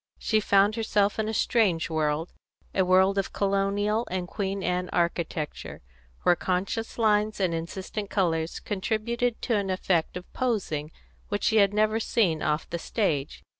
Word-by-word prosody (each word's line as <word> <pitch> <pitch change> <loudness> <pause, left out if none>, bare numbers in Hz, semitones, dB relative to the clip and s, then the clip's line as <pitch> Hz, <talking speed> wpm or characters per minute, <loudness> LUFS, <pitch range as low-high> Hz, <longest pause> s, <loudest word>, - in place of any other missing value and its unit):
She 220 - +1
found 200 0 +3
herself 210 -2 +1
in 220 0 0
a - - 0
strange 200 -8 +2
world 155 0 -1 0.4
a 190 - +3
world 190 +2 +4
of 195 - -3
colonial 200 +3 0
and 180 -1 -3
Queen 195 0 -3
Anne 180 0 -1
architecture, 170 - -2 0.4
where 175 - +5
conscious 190 +6 -2
lines 215 -1 +2
and 185 -3 +1
insistent 190 +5 -5
colours 165 -4 0
contributed 225 +4 -1
to 235 - +1
an 200 -1 -1
effect 185 -2 0
of 180 - -8
posing 190 - -1 0.4
which 205 0 -2
she 220 - +3
had 200 -2 +5
never 215 +1 +2
seen 185 -8 +1
off 150 +1 0
the 170 - -4
stage. 160 -9 -2
195 Hz, 155 wpm, -27 LUFS, 175-215 Hz, 0.4 s, where